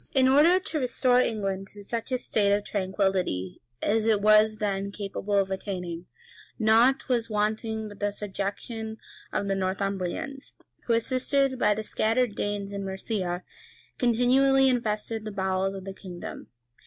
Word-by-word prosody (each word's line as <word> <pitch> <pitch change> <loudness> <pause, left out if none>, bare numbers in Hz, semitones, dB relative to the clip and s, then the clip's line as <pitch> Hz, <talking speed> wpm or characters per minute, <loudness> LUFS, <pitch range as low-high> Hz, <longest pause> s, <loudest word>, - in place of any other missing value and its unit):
] - - -30
In 260 -1 +5
order 305 +7 +6
to 335 -4 -3
restore 250 -1 +3
England 195 -4 -2
to 205 -1 -10
such 230 +4 -4
a 255 - +2
state 210 -4 +1
of 205 0 +2
tranquillity 190 - -1 0.2
as 220 +1 +2
it 215 -2 +4
was 215 +1 +5
then 200 -1 -2
capable 200 0 -3
of 195 -1 +2
attaining, 180 -3 -4 0.5
nought 230 +4 +4
was 235 -3 0
wanting 220 +1 -1
but 205 -1 -11
the 205 - +1
subjection 210 +3 -5 0.3
of 200 - -1
the 195 - +1
Northumbrians, 195 +7 -3 0.3
who, 235 - +3
assisted 260 +3 +1
by 210 - +3
the 215 - -3
scattered 225 +2 +1
Danes 205 -1 -3
in 200 0 -4
Mercia, 190 -2 -3 0.6
continually 265 +3 +4
infested 225 -2 -1
the 215 - -5
bowels 190 0 -1
of 190 -1 -8
the 195 - -5
kingdom. 180 -2 -8
210 Hz, 155 wpm, -27 LUFS, 195-235 Hz, 0.6 s, order